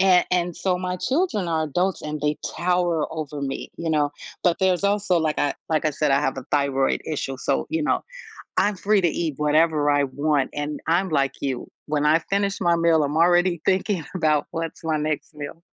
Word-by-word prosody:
a 185 -2 +5
and 175 -1 0
so 180 -2 0
my 180 0 -2
children 260 - 0
are 160 -1 +1
adults 180 +5 -1
and 150 -1 -4
they 150 0 0 0.2
tower 175 -3 +1
over 150 -2 -5
me, 135 -1 -4
you 165 -1 -3
know, 145 -2 +1 0.3
but, 175 -2 +3
there's 190 0 +2
also, 200 -3 +2
like, 155 -1 0
I 145 - +1
like 155 -1 +1
I 155 - +3
said, 150 -1 0
I 140 - +4
have 135 -2 -1
a 130 - -7
thyroid 140 -2 +1
issue, 135 -3 -3
so, 140 - 0
you 320 -1 0
know, - - 0 0.5
I'm 205 0 +3
free 200 +1 +2
to 175 - +3
eat 160 -3 -2
whatever 150 0 +3
I 145 0 +3
want, 140 +1 0
and 145 0 -3
I'm, 175 +3 +2
like, 140 -3 +1
you. 130 -3 -3 0.2
When 150 0 0
I 155 +2 +5
finish 200 +3 -1
my 170 -2 +3
meal, 165 -2 +3
I'm 145 +2 -1
already 175 0 +3
thinking 185 -3 +1
about 155 -4 +2
what's 165 -1 -4
my 160 -1 0
next 150 0 -3
meal. 145 +3 -7
160 Hz, 205 wpm, -23 LUFS, 145-180 Hz, 0.5 s, a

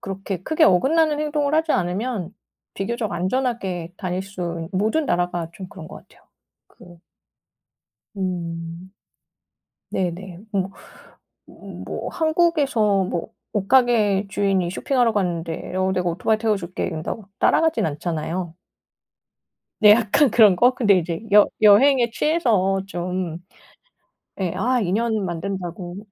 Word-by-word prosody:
그렇게 195 -1 -5
크게 315 - +2
어긋나는 295 - +3
행동을 300 -1 0
하지 320 0 +2
않으면 190 +1 -2 0.4
비교적 220 +2 -3
안전하게 185 -4 -2
다닐 185 -1 -3
수 175 -4 -5
있 - - -2
모든 220 +10 +1
나라가 175 -3 -1
좀 185 +1 -9
그런 160 -3 -11
것 - - -10
같아요. - - -23 0.5
그 175 -1 -17 1.2
음. 170 -1 -5 1.0
네네. 180 0 -3
뭐, 195 -1 -1 0.8
뭐 - - -8
한국에서 295 - +2
뭐 180 +3 -4 0.2
옷가게 210 -2 +3
주인이 195 -3 0
쇼핑하러 245 +1 +1
갔는데 175 -3 -3
어 185 0 +1
"내가 180 -2 0
오토바이 215 +6 0
태워 215 -2 +1
줄게." 180 0 -4
이런다고 170 +6 -5
따라가진 325 - +2
않잖아요. 165 +2 -3 1.3
네. 210 -2 +8
약간 235 +5 +4
그런 210 -5 +6
거? 245 +5 +5
근데 205 -7 +4
이제 170 +1 -3
여 210 0 +8
여행에 235 +4 +5
취해서 225 - +1
좀 180 -2 -4 1.0
예, 185 -3 -1
아 250 +5 +1
인연 215 +2 0
만든다고 175 0 -5
195 Hz, 260 characters per minute, -22 LUFS, 175-235 Hz, 1.3 s, 네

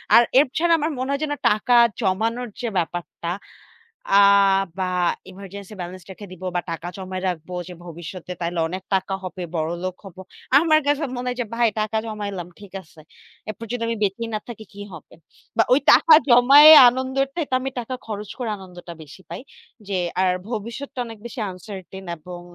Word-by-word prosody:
আর - - +9 0.2
এছাড়া 315 +5 +2
আমার 310 +2 -1
মনে 260 +1 -3
হয় 280 - -1
যেন 295 -1 -1 0.2
টাকা 215 +4 +1 0.3
জমানোর 225 +5 -1
যে 240 - -2
ব্যাপারটা, 170 -1 -4 0.9
আ - - +8 0.6
বা 190 - 0 0.4
এমার্জেন্সি 200 +2 -10
ব্যালেন্স 180 +1 -7
রেখে 205 +2 -10
দিবো 185 0 -8
বা - - +2
টাকা 165 +1 -5
জমায় 185 -1 -6
রাখবো। 180 0 -5
যে 180 - -9
ভবিষ্যতে 175 +2 -8
তাইলে 170 0 -2
অনেক 185 +3 -6
টাকা 190 0 0
হবে, 185 0 -6
বড়লোক 170 +3 -3
হব। 190 -3 -12 0.4
আমার 310 -1 +4
কাছে 290 +1 +1
মনে 245 +1 -5
হয় 250 0 -4
যে 240 - -2
ভাই 235 0 +3
টাকা 215 +1 -2
জমাইলাম, 205 -5 -5
ঠিক 205 -2 -13
আছে। 160 -2 -19 0.5
এরপর 215 +2 -6
যদি 245 -1 -3
আমি 230 - -1
বেঁচেই 210 +3 -1
না 215 - -1
থাকি 220 -2 -8
কি 200 - -11
হবে? - - -12 0.4
বা 225 - +5
ওই 265 - +5
টাকা 320 - +7
জমায়ে 275 +5 +9 0.2
আনন্দের 260 +2 0
তো - - -7 0.2
আমি 265 +1 -3
টাকা 245 +2 -6
খরচ 210 -1 -6
করে 240 -3 -3
আনন্দটা 180 -3 -11
বেশি 155 +4 -14
পাই। - - -6 0.5
যে 200 - -3 0.3
আর 185 -1 +3 0.2
ভবিষ্যৎ-টা 235 +5 -6
অনেক 225 -1 -10
বেশি 235 +1 -7
আনসার্টেন 190 0 -10
এবং 175 +2 -10
205 Hz, 175 wpm, -22 LUFS, 180-245 Hz, 0.9 s, আর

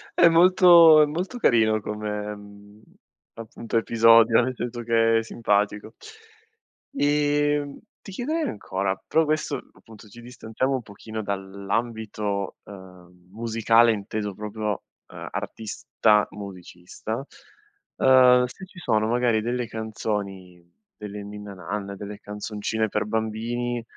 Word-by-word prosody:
È 170 - +6
molto 170 -2 +7
è - - +6
molto 180 +11 -4
carino 110 - +3
come, 105 0 -7 0.5
appunto, 115 0 -5
episodio, 115 +1 +5
nel 130 +1 -2
senso 120 0 -5
che 115 -1 +3
è - - -4
simpatico. 105 -1 -1 1.0
Ehm, 145 - +1 0.2
ti 195 - -11
chiederei 305 - -2
ancora, 95 -1 -3
però 160 0 +2
questo, 155 -1 -1 0.2
appunto, 110 -1 -16
ci 120 +4 -14
distanziamo 125 +2 -3
un 130 - -3
pochino 110 +2 -8
dall'ambito, 100 +1 -3
uhm, 90 -2 -15
musicale 115 +1 +3
inteso 105 -1 -4
proprio, 105 0 -4 0.2
uhm, - - -9
artista 105 -1 0
musicista. 100 +4 -8 0.7
Ehm, 125 -1 +6
se 125 +10 -10
ci 185 -1 -15
sono 110 -9 +1
magari 120 -2 +1
delle 120 +1 -2
canzoni, 105 -5 -5 0.3
delle 105 -1 -8
ninna 105 0 -9
nanne, 100 +2 -5
delle 105 +1 -8
canzoncine 105 +1 -3
per 105 +1 -1
bambini 115 +2 -3
110 Hz, 115 wpm, -24 LUFS, 105-125 Hz, 1.0 s, molto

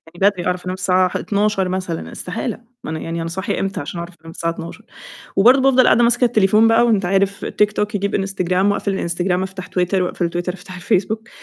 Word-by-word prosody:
يعني - - -12
بدري 180 -3 -6
أعرف 180 0 -2
أنام 185 - -2
الساعة 185 0 +2
ح - - -3
00:00 200 -2 0
مثلًا، 185 -3 -4
استحالة، 205 +6 -4 0.2
ما - - -6
أنا 160 - -3
يعني 165 0 -4
أنا 165 - -3
صاحية 190 +3 -3
إمتى 195 0 -2
عشان 170 +4 -5
أعرف 170 +1 -7
أنام 165 0 -11
الساعة 165 0 -2
00:00، 165 0 -9 0.5
وبرضه 250 +7 +6
بافضَل 260 -1 +5
قاعدة 240 +2 +5
ماسكة 240 +1 +3
التليفون 215 -1 +4
بقى 230 +1 +4
وأنت 205 -5 +2
عارف 195 +1 0
تيك 210 0 +1
توك 210 +1 -2
يجيب 200 0 -1
إنستجرام 195 0 +1
وأقفل 200 -1 -1
الإنستجرام 180 +1 -1
أفتح 190 -1 -7
تويتر 180 0 0
وأقفل 175 -1 -2
تويتر 175 +1 -3
أفتح 185 -1 -11
الفيسبوك، 215 +4 -1
190 Hz, 210 wpm, -19 LUFS, 180-210 Hz, 0.5 s, وبرضه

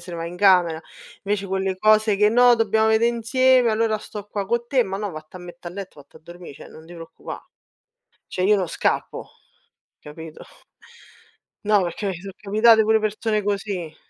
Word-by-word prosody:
se 180 - -10
va 165 0 -5
in 175 +1 -8
camera. 180 -4 +3 0.4
Invece, 200 0 -2
quelle 190 0 -2
cose 215 0 +3
che: 210 +1 +4
“No, 245 +2 +5
dobbiamo 220 -1 +1
vede' 220 +1 +3
insieme, 245 +1 +2
allora 220 0 0
sto 210 -1 -9
qua 205 -1 -4
co' 235 +3 -2
te". 255 0 +2
"Ma 195 -2 -5
no, 205 -1 -4
vatte 155 +3 -11
a - - -13
mette' 175 0 -10
a - - -11
letto, 190 -5 -9
vatti 140 - -19
a - - -14
dormì, 175 0 -12
cioè, 140 - -13
non 160 - -14
ti 170 - -14
preoccupà”, 165 -1 -10 0.9
cioè, 185 0 -2
io 210 - +4
non 185 -3 -2
scappo, - - -2 0.7
capito? 155 +1 -11 1.2
No, 205 -1 +3
perché 180 +4 -4
mi 190 - -4
sono 195 0 -9
capitate 220 +2 +4
pure 220 0 +2
persone 215 0 -1
così. 195 -5 -4
200 Hz, 185 wpm, -22 LUFS, 175-220 Hz, 1.2 s, No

